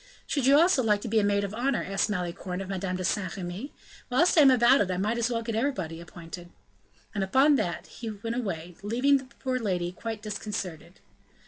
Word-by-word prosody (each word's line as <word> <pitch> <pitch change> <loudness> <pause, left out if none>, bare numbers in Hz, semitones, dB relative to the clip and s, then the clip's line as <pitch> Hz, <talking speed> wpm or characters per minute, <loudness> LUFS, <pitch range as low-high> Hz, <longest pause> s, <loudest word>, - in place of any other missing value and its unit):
"Should 280 -4 0
you 280 +1 +7
also 340 -5 +4
like 210 -3 +2
to - - -5
be 220 0 +3
a - - +1
maid 200 0 +2
of 200 0 -4
honor?" 255 +3 0
asked 195 +2 0
Malicorne 180 -1 -3
of 195 - -5
Madame 190 -1 -2
de 185 - -3
Saint 185 0 -1
Remy. 190 +9 -5 0.4
"Whilst 310 +9 +3
I 320 - +7
am 275 - +8
about 250 +1 +5
it, 195 - 0
I 185 - -1
might 215 +5 0
as 235 +1 +1
well 230 -1 -1
get 230 0 -3
everybody 200 - -2
appointed." 170 +1 -10 0.6
And 200 - -1
upon 265 +10 +4
that 180 -7 -2
he 230 - -7
went 225 +2 -4
away, 180 -8 -4
leaving 250 +7 +3
the 270 - -8
poor 255 +1 -3
lady 180 -6 -1
quite 220 +3 -6
disconcerted. 195 - -5
210 Hz, 215 wpm, -28 LUFS, 185-245 Hz, 0.6 s, am